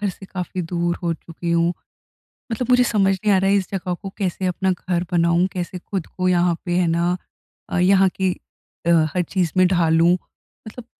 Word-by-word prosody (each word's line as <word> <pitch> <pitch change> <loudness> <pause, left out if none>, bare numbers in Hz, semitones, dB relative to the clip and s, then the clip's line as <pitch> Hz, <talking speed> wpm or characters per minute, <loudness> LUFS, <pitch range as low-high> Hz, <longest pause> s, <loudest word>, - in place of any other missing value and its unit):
घर 205 - 0
से 190 +1 -8
काफ़ी 180 -1 -4
दूर 170 0 -1
हो 170 -1 0
चुकी 170 +1 -7
हूँ। 170 +1 +2 0.8
मतलब 250 +2 -2
मुझे 250 0 +5
समझ 200 -5 +2
नहीं 205 -2 +4
आ - - +5
रहा 195 +1 +2
इस 190 -2 -2
जगह 185 -2 -2
को 195 +3 -7
कैसे 190 -1 -2
अपना 185 +1 0
घर 180 0 -2
बनाऊँ? 170 0 +3
कैसे 180 0 -4
ख़ुद 185 -1 -4
को 185 - +1
यहाँ 175 -1 +2
पे 175 - -1
है 180 -2 +2
ना 170 +2 +1 0.5
अ, - - -2
यहाँ 190 +1 +5
की 190 0 -1 0.5
अ, - - +1 0.3
हर 180 - +2
चीज़ 180 -4 0
में 185 - +6
ढालूँ? 170 -1 +3 0.5
मतलब 230 +2 -10
180 Hz, 195 wpm, -21 LUFS, 175-190 Hz, 0.8 s, में